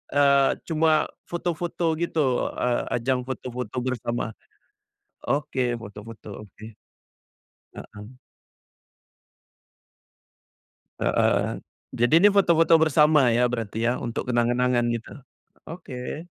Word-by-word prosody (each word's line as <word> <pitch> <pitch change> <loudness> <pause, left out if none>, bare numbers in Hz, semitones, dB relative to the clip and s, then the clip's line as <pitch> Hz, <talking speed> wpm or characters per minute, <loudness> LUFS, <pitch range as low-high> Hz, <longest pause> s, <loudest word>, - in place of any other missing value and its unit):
eee, 140 -1 +4 0.2
cuma 160 -1 +2 0.2
foto-foto 175 -1 -2
gitu, 150 -7 0
eee, 125 -1 0
ajang 125 +1 -1
foto-foto 125 -3 -6
bersama? 120 -2 -3 0.9
Oke, 130 -2 -1
foto-foto, 105 -1 -10
oke. 105 +1 -15 1.1
Heeh. 105 0 -10 3.0
Heeh, - - +1 0.4
jadi 120 +4 +2
ini 205 - +8
foto-foto 170 -4 +4
bersama 155 -1 +4
ya, 120 - +2
berarti 110 -3 -4
ya, 120 - +3
untuk 120 +1 -4
kenang-kenangan 120 0 +1
gitu, 115 -1 -6 0.6
oke. 155 -2 -7
125 Hz, 90 wpm, -24 LUFS, 120-155 Hz, 3.0 s, ini